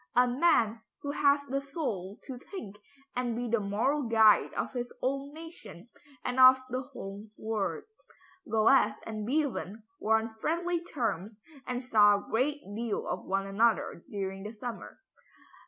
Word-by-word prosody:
A 250 +1 +5
man 245 -5 +2 0.2
who 285 - -2
has 285 0 +3
the 275 0 -2
soul 235 - -4
to 255 -3 -7
think 225 - -9 0.4
and 245 -2 -1
be 245 +1 -2
the 235 0 +2
moral 215 +9 0
guide 220 -4 +5
of - - -2
his 245 -1 -4
own 275 +2 -2
nation 315 - -11 0.4
and 250 +1 -1
of 255 0 +9
the 255 +1 -1
whole 210 -6 -9
world." 210 -7 -2 0.7
Goethe 220 0 +4
and 215 -1 -5
Beethoven 250 - -1 0.2
were 220 +1 +3
on 220 0 -4
friendly 345 +1 0
terms 220 - -3 0.3
and 250 0 -2
saw 210 -4 +6
a 200 - -5
good 285 +6 +1
deal 230 -1 -2
of - - -3
one 195 +1 -1
another 205 -3 +1
during 195 -1 -4
this 210 +2 -8
summer. 240 -1 -6
235 Hz, 155 wpm, -30 LUFS, 210-275 Hz, 0.7 s, of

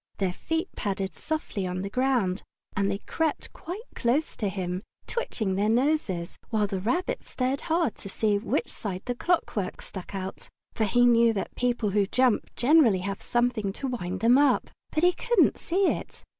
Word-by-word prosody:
Their 190 -3 0
feet 325 - -2
padded 195 -1 -2
softly 305 -11 -3
on 180 +1 -3
the 200 - -3
ground, 240 -7 +1 0.3
and 200 0 +1
they 200 - 0
crept 315 +8 -2
quite 375 +6 -7
close 265 +6 0
to 205 - 0
him, 185 -1 -3 0.2
twitching 220 - -2
their 200 +3 +1
noses, 230 - 0
while 215 -2 +2
the 195 -2 -2
Rabbit 290 - -1
stared 260 +2 -2
hard 325 -6 +1
to 195 - -8
see 205 +1 +1
which 215 - -1
side 190 -3 -4
the 245 - -1
clockwork 240 - -1
stuck 190 +1 -8
out, 190 0 -6 0.2
for 220 - +1
he 245 +4 +4
knew 235 -1 +5
that 200 - -3
people 245 -4 0
who 200 0 +2
jump 255 0 +2
generally 245 - +5
have 200 +1 -4
something 240 -4 0
to 275 - -5
wind 190 -6 -3
them 240 +4 +6
up. 285 -3 +3 0.2
But 310 - 0
he 360 0 +6
couldn't 475 -3 +3
see 380 +3 +1
it. - - -5
225 Hz, 180 wpm, -27 LUFS, 195-270 Hz, 0.3 s, them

